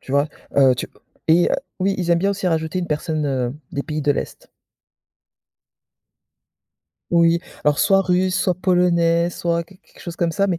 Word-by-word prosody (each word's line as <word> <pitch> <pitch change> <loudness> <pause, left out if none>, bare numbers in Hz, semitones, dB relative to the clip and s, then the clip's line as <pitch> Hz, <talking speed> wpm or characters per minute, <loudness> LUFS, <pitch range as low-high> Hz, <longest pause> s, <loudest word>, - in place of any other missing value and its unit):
Tu - - -12
vois? 140 +2 +2 0.3
Heu, 135 -2 +6
tu 125 - -4 0.4
et 170 +2 +5 0.3
oui 195 +1 +1
ils 175 -2 -1
aiment 170 - +4
bien 195 +3 +1
aussi 200 -1 -3
rajouter 160 +1 -1
une 175 - -2
personne, 155 0 -2
heu, 130 -2 -1 0.2
des 140 - -2
pays 155 0 -4
de 145 - +2
l'est. - - -6 2.6
Oui, 170 0 +4 0.2
alors 145 -1 +2
soit 195 -1 +4
russe, 185 0 +1
soit 180 - +1
polonais, 175 -2 +2
soit 170 -1 -2
quelque 185 +2 -21
quelque - - -21
chose 170 -1 -7
comme 170 -1 0
ça 200 +4 +1
mais 180 -4 -1
170 Hz, 175 wpm, -21 LUFS, 155-180 Hz, 2.6 s, Heu